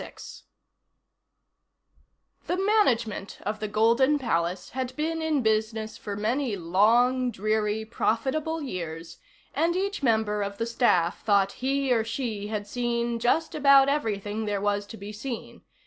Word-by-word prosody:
6 - - -11 2.0
The 355 - 0
management 255 - +1
of 210 +1 -3
the 215 - -3
Golden 235 +7 +3
Palace 180 -8 -1
had 255 0 -4
been 325 +2 -2
in 310 -4 0
business 220 0 0
for 205 -1 -6
many 230 +3 -1
long, 235 +9 +3
dreary, 215 0 -1
profitable 275 +8 -1
years, 170 - -6 0.3
and 340 +1 +1
each 395 0 -2
member 220 -4 +1
of 200 0 -4
the 230 - -1
staff 205 -8 +1
thought 200 -2 +3
he 270 0 +1
or 225 -2 +2
she 225 -3 -3
had 210 -1 -3
seen 235 +1 -1
just 285 +8 +1
about 275 -2 +6
everything 220 -6 -2
there 205 -1 -1
was 205 0 -1
to 225 - -9
be 200 +1 -8
seen. 230 +3 -7
225 Hz, 140 wpm, -26 LUFS, 205-265 Hz, 2.0 s, about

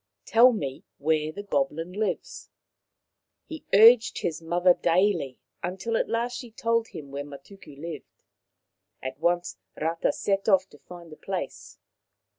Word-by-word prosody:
Tell 240 +3 +6
me 140 - -4
where 155 +1 0
the 205 +5 -7
goblin 165 0 -1
lives.' 210 +2 -3 0.5
' - - -58
He 320 -2 -9
urged 225 +3 +7
his 160 -1 -2
mother 175 +2 +3
daily, 175 -7 +1 0.4
till 230 +4 -2
at - - 0
last 235 +2 -1
she 245 - -9
told 230 0 0
him 140 -3 -10
where 140 +1 -4
Matuku 145 +1 -13
lived. 160 -2 -9 0.8
At 130 +1 -5
once 175 +2 0 0.2
Rata 165 +2 0
set 195 +1 -1
off 190 -1 +4
to 145 - -17
find 175 -2 -12
the 155 - -11
place. 185 -8 -6
175 Hz, 145 wpm, -26 LUFS, 155-210 Hz, 0.8 s, urged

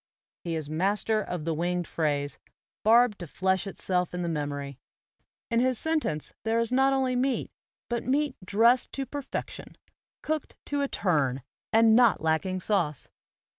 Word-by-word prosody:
He 170 -2 -2
is 155 -2 -4
master 200 +7 +1
of 180 -6 -5
the 165 - 0
winged 175 +2 -1
phrase, 145 -3 -1 0.4
barbed 230 0 +5
to 175 - -6
flesh 190 +4 0
itself 180 -2 -1
in 180 - -2
the - - -2
memory. 145 -4 -3 0.7
In 230 - +3
his 255 0 +2
sentence 310 - -1
there 225 +1 +1
is 230 0 0
not 265 +2 +4
only 260 -2 +1
meat, 255 +1 0 0.4
but 240 -1 -1
meat 280 +1 0
dressed 230 +6 +3
to 275 - -3
perfection, 275 +1 -6 0.5
cooked 310 -1 -3
to 285 0 -1
a 280 - +1
turn, 140 - 0 0.3
and 225 0 +6
not 240 -4 +5
lacking 160 +4 0
sauce. 175 - -1
200 Hz, 155 wpm, -28 LUFS, 160-250 Hz, 0.7 s, and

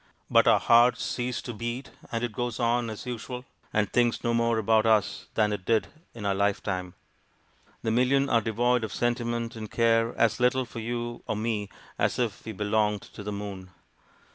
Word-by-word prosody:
But - - +5
our - - +6
hearts 120 0 +5
cease 125 -1 -2
to 120 - -5
beat, 120 +4 -5 0.2
and 115 0 -2
it 120 - -1
goes 120 +2 -3
on 120 0 +1
as 110 - -7
usual, 125 +1 -5 0.3
and 105 -1 +2
thinks 120 -1 +2
no 120 - +1
more 115 -1 +2
about 110 +1 +3
us 110 -3 +2
than 105 -1 +2
it 100 - -4
did 110 +2 +1 0.3
in 110 -3 -6
our 100 - +2
lifetime. 95 -2 -1 0.9
The 110 - 0
million 130 +4 +3
are 115 -3 +3
devoid 120 +2 +1
of 110 - -3
sentiment, 120 -1 -1
and 110 -2 -6
care 115 0 +2
as 115 - +2
little 125 +1 +2
for 115 - -8
you 120 +1 -4
or - - -1
me 105 -2 -2 0.3
as - - +1
if 120 -5 -2
we 110 - -4
belonged 105 0 0
to - - -8
the 105 +1 -4
moon. 100 -2 -6
115 Hz, 190 wpm, -27 LUFS, 105-120 Hz, 0.9 s, our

